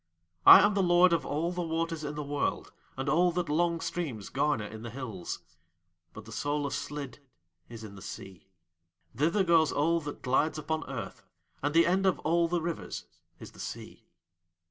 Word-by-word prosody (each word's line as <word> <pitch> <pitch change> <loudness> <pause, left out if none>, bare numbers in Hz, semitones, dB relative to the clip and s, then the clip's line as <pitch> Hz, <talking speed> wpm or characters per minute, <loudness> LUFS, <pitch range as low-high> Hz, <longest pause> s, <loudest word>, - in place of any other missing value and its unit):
I - - +12
am 210 - +3
the 200 - +1
Lord 175 0 +5
of 165 - 0
all 160 +4 -1
the 180 0 -3
waters 165 -1 -2
in 150 0 -4
the 150 - -4
world 145 0 -2 0.2
and 135 +2 -3
all 175 +5 +3
that 175 -2 -2
long 170 +2 +1
streams 135 - -4
garner 140 -6 0
in 110 +1 -9
the 120 - -6
hills; 110 -8 -6 0.7
but 110 -1 -11
the 110 - -11
soul 145 +5 -1
of 140 - -3
Slid 140 -3 -5 0.5
is 115 -2 -9
in 105 -2 -9
the 95 - -12
Sea. 95 -2 -9 0.7
Thither 170 +7 +2
goes 165 -4 +4
all 165 +3 +2
that 145 -1 -8
glides 145 +5 +1
upon 160 +1 -3
Earth, 115 -8 -6 0.4
and 145 +2 -1
the 165 - +6
end 190 +2 +2
of 185 - +2
all 170 +2 +2
the 170 -1 -1
rivers 170 -1 -4 0.3
is - - -10
the - - -18
Sea." - - -8
150 Hz, 190 wpm, -29 LUFS, 130-170 Hz, 0.7 s, I